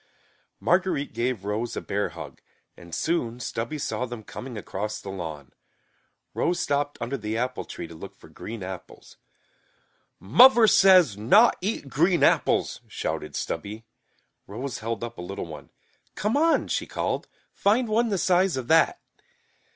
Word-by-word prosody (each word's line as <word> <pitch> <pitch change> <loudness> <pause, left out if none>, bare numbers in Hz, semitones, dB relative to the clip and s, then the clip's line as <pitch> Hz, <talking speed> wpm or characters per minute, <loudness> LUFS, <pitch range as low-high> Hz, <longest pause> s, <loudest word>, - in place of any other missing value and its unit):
Marguerite 175 -5 +1
gave 115 -3 -2
Rose 110 +3 -2
a - - +1
bear 100 +1 -2
hug - - -10 0.3
and 85 -2 -9
soon 125 -8 -1
Stubby 115 +4 -4
saw 125 -3 -2
them 120 -2 -8
coming 125 +2 -8
across 105 +1 -4
the 95 - -7
lawn. 80 -8 -7 0.8
Rose 175 - 0
stopped 145 0 -1
under 125 +4 -3
the 110 +1 -3
apple 125 +2 -2
tree - - -7
to - - -12
look 80 - -10
for - - -17
green 115 -3 -8
apples. 95 -1 -9 1.0
"Muvver 235 - +7
says 180 - +6
not 205 - +5
eat 195 -6 -2
green 170 +6 +2
apples," - - +2
shouted - - -4
Stubby. 105 +7 -4 0.6
Rose 120 +5 -5
held 115 0 -4
up 120 - -6
a - - -4
little 95 +2 -5
one. 80 -2 -10 0.5
"Come 210 +5 0
on," 325 +3 +3
she - - -2
called. - - -2 0.3
"Find 225 +5 +2
one 225 +2 +2
the 200 - 0
size 180 -3 +2
of 125 -2 -4
that!" 165 0 +4
125 Hz, 150 wpm, -26 LUFS, -, 1.0 s, Muvver